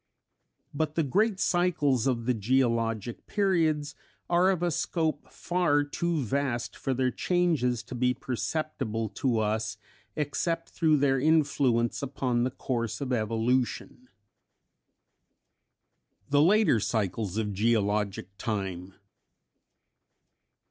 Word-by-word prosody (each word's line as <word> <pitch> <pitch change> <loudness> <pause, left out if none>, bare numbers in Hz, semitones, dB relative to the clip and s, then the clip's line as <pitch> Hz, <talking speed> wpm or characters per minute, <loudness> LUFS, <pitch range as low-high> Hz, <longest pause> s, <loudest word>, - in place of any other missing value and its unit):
But 155 +1 -2
the 165 - +2
great 200 - +1
cycles 150 - +2
of 120 -3 0
the 125 - +2
geologic 115 -1 0
periods 160 -8 +1 0.4
are 175 +2 +4
of 180 -3 0
a 175 - +1
scope 160 -1 -2
far 175 -5 +1
too 160 +1 -1
vast 130 -1 -2
for 135 - -2
their 130 0 +1
changes 155 -11 +1
to 125 - -10
be 125 +1 +1
perceptible 125 -4 -3
to 120 +3 -1
us 110 0 -1 0.4
except 165 +3 -2
through 160 -3 +2
their 135 -1 +2
influence 140 -6 +2
upon 130 -3 -1
the 125 - +1
course 120 -3 -3
of 135 -3 -2
evolution. 120 +3 -1 2.2
_The 145 0 +5
Later 200 - +4
Cycles 105 -2 -2
of 105 -2 -1
Geologic 105 -3 0
Time. 95 -4 -4
130 Hz, 110 wpm, -28 LUFS, 115-155 Hz, 2.2 s, The